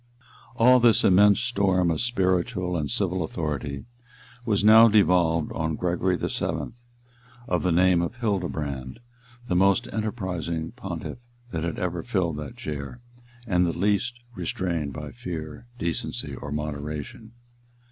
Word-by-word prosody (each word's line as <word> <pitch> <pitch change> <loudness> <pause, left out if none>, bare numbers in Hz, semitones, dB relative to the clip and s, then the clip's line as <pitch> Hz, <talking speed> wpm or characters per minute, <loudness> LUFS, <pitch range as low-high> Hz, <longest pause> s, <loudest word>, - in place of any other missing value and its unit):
All 125 +2 +6
this 115 -3 +4
immense 100 +1 +6
storm 95 -7 +2
of 80 - -1
spiritual 95 -4 0
and 75 -3 -2
civil 95 -6 -1
authority 75 -4 -4 0.6
was 105 -3 +1
now 110 +2 +9
devolved 90 -7 +3
on 80 -1 -2
Gregory 90 +1 0
VII., - - -3 0.8
of 90 - 0
the 90 - +1
name 90 0 +4
of 85 - -3
Hildebrand, 80 - -3 0.5
the 90 - 0
most 95 +1 +3
enterprising 90 -7 -3
pontiff 100 -4 -6 0.3
that 80 -4 -3
had 85 -1 -3
ever 90 -2 -2
filled 90 -9 -1
that 75 -2 -7
chair, 75 - -6 0.5
and 90 -5 +2
the 85 -1 -1
least 105 +6 +1 0.2
restrained 85 -5 -2
by 75 +2 -7
fear, 85 -6 -7
decency, 85 -8 -3
or 75 - -7
moderation. 75 +8 -5
90 Hz, 130 wpm, -25 LUFS, 80-105 Hz, 0.8 s, now